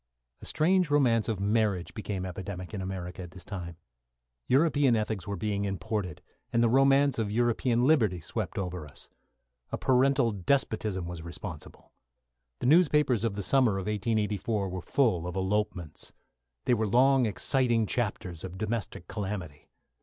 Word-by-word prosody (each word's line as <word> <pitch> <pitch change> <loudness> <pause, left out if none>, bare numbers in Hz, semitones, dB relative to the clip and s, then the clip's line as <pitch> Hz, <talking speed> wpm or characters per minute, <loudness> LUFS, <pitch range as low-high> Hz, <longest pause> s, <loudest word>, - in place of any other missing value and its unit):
A - - -6
strange 180 +1 +2
romance 120 -6 +3
of 110 -4 -1
marriage 100 -3 0
became 100 -4 -4
epidemic 95 +1 -6
in 100 - -3
America 95 -1 -5
at 90 - -8
this 90 0 -11
time. 85 -5 -6 0.7
European 140 -2 +4
ethics 105 -4 -2
were 100 - -2
being 100 -1 -2
imported, 100 -2 -3 0.3
and 115 - +3
the 115 - +4
romance 135 +1 +4
of 105 -2 -1
European 120 +1 +2
liberty 115 - +3
swept 80 - -4
over 90 -3 -3
us. 70 -1 -11 0.6
A - - -2
parental 130 -1 +3
despotism 105 -3 0
was 85 -1 -6
responsible. 85 -1 -9 0.7
The - - -2
newspapers 150 - +4
of 115 -3 0
the 100 - -3
summer 130 -1 +3
of 95 -1 -3
1884 105 -1 -1
were 90 0 -5
full 90 -8 +1
of 90 - -5
elopements. 95 -4 -2 0.5
They - - +3
were 110 -2 +1
long 130 +3 +4
exciting 120 +2 +1
chapters 100 -7 -3
of 95 0 -7
domestic 105 -4 -4
calamity. 95 -8 -5
105 Hz, 150 wpm, -29 LUFS, 95-120 Hz, 0.7 s, European